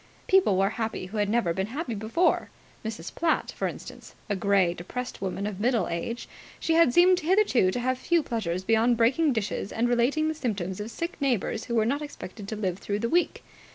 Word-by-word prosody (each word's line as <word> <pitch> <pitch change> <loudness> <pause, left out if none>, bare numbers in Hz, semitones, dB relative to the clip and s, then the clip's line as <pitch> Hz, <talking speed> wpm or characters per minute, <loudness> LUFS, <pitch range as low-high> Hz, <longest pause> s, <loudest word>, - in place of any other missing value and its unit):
People 380 - +4
were 195 +2 +2
happy 220 -4 -2
who 200 +4 -7
had 205 -1 +1
never 210 -7 +1
been 190 +3 -2
happy 255 +1 -4
before. 220 - +1 0.3
Mrs. 215 -6 -6
Platt, 330 -1 0
for - - -1
instance. - - -9 0.2
A - - +2
grey, 195 -3 +2
depressed 245 +9 -6
woman 195 +1 -3
of 205 -2 -4
middle 235 +1 +1
age, 200 +8 -4 0.3
she 325 - 0
had 330 -6 +5
seemed 360 +5 +5
hitherto 345 - +3
to 215 - -2
have 255 +1 -1
few 340 +1 +2
pleasures 185 -8 -2
beyond 225 +3 +3
breaking 265 +7 +3
dishes 215 -4 -2
and 235 +2 +1
relating 245 +6 +2
the 315 - 0
symptoms 200 - -3
of 210 +2 -5
sick 335 +7 -5
neighbours 235 -4 0
who 235 - -3
were 220 -1 +3
not 280 +6 0
expected 215 -8 -8
to 220 - -4
live 190 -3 -2
through 205 0 -2
the 230 +2 -2
week. 350 +4 +1
230 Hz, 205 wpm, -27 LUFS, 200-280 Hz, 0.3 s, had